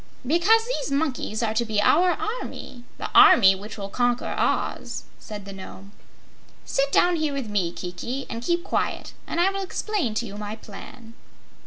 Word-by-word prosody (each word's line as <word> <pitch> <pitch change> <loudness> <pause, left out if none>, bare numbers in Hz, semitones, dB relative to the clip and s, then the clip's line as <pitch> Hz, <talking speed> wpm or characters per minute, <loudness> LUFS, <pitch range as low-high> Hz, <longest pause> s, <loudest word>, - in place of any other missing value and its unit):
"Because 360 - +4
those - - -3
monkeys 275 -6 -1
are 220 -1 0
to 230 +2 +1
be 220 -2 -1
our 355 - +4 0.3
army 240 - -8
the - - -5
army 195 -4 +8
which 205 +4 -8
will 200 -1 -5
conquer 245 +3 0
Oz," - - -1 0.2
said 205 -2 -8
the 200 - -8
Nome. 195 +1 -11 0.7
"Sit 275 +1 0
down 350 +3 +4
here 310 -2 -1
with 275 -4 -3
me, 195 -5 0
Kiki, 210 +11 -5
and 230 - -5
keep 345 +7 0
quiet, - - -2
and - - -2
I 370 +3 +4
will 390 0 -3
explain 375 - -2
to 235 - -1
you 205 -2 -8
my 210 0 -5
plan." 225 +2 -12
240 Hz, 175 wpm, -24 LUFS, 205-325 Hz, 0.7 s, army